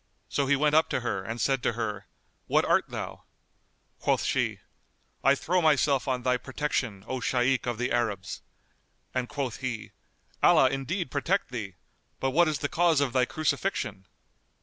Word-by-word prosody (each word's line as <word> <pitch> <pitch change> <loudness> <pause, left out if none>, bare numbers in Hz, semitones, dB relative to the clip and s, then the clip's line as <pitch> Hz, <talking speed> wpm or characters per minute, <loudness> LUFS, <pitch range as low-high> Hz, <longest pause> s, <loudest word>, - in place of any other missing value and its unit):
So 140 - 0
he 140 - +4
went 150 +1 +2
up 160 +1 +4
to - - -1
her 100 -5 -2
and 110 +4 -5
said 135 0 +1
to 120 - +1
her, 105 -4 -4 0.4
"What - - +3
art - - +2
thou?" - - -6 0.7
Quoth - - +1
she, - - 0 0.7
"I 135 +1 +5
throw 180 +6 +1
myself 145 -3 +3
on 125 -2 -1
thy 125 0 +2
protection, 125 -7 -3
O 130 - -2
Shaykh 125 +1 +1
of 120 -2 -1
the 125 +2 -1
Arabs!" 105 -6 -1 0.7
and 125 -1 -1
quoth 135 -5 -3
he, 125 -4 -5 0.5
"Allah - - +6
indeed 165 +7 -3
protect 165 +3 0
thee! 105 -6 -5 0.4
But 135 - 0
what 170 +5 +4
is 155 -2 0
the - - +3
cause 165 -1 +3
of 140 -4 0
thy 130 -1 +3
crucifixion?" 140 - -2
130 Hz, 170 wpm, -28 LUFS, 120-145 Hz, 0.7 s, Allah